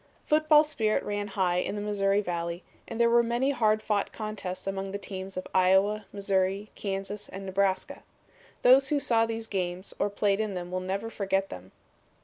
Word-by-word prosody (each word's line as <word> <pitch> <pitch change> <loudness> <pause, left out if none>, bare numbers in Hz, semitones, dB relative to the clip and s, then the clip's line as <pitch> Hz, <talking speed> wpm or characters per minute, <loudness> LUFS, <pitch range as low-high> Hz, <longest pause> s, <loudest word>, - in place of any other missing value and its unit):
"Football 305 0 +5
spirit 225 -8 0
ran 205 0 -3
high 185 -3 0
in 180 - -1
the 205 - -3
Missouri 205 -1 +1
Valley 170 -2 -3 0.2
and 230 - -6
there 235 - +5
were 235 0 +5
many 240 +4 +1
hard 215 -5 +2
fought 205 -2 0
contests 200 -4 -5
among 195 0 -3
the 200 - -3
teams 190 -1 -7
of 185 - -4
Iowa, 190 +3 +3
Missouri, 195 0 -1
Kansas 195 +1 -4
and 195 +1 -7
Nebraska. 190 0 -1 0.6
Those 265 +2 +7
who 295 - +2
saw 230 -4 +2
these 225 0 -4
games 185 -2 -3
or - - +1
played 200 0 +1
in 215 -3 -2
them 175 0 -5
will 185 - -1
never 195 +5 -3
forget 195 -2 -1
them. 90 +1 -9
200 Hz, 180 wpm, -28 LUFS, 190-220 Hz, 0.6 s, Those